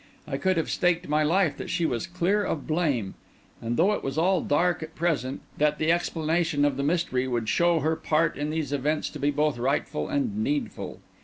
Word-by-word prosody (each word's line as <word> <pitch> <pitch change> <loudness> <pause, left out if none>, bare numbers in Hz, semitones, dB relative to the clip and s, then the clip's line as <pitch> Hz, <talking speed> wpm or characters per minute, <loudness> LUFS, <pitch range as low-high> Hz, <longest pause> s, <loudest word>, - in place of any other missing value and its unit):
I - - -2
could 190 -2 +1
have 160 - -1
staked 175 0 +1
my 150 +1 +2
life 165 +1 +2
that - - -6
she 170 - 0
was 120 -7 -1
clear 180 +4 +1
of 160 -6 -3
blame, 145 - 0 0.5
and, 115 +1 -2
though 185 +6 +4
all 210 - 0 0.4
was - - -7
dark 175 +4 +2
at 160 0 -8
the - - -21
present, 145 -6 -1 0.2
that 150 0 +2
the 155 +1 +2
explanation 165 -3 +1
of 145 -2 +1
the 140 - -2
mystery 145 -4 0
would 120 -3 -1
show 170 +5 +3
her 160 +3 +1
part 160 +1 +1
in 145 +1 -3
these 155 -3 -2
events 150 +3 -1
to - - -8
be 145 - +2
both 150 -2 0
right 135 +4 +1
and 270 -8 -1
needful. 285 -1 -3
155 Hz, 210 wpm, -26 LUFS, 145-175 Hz, 0.5 s, though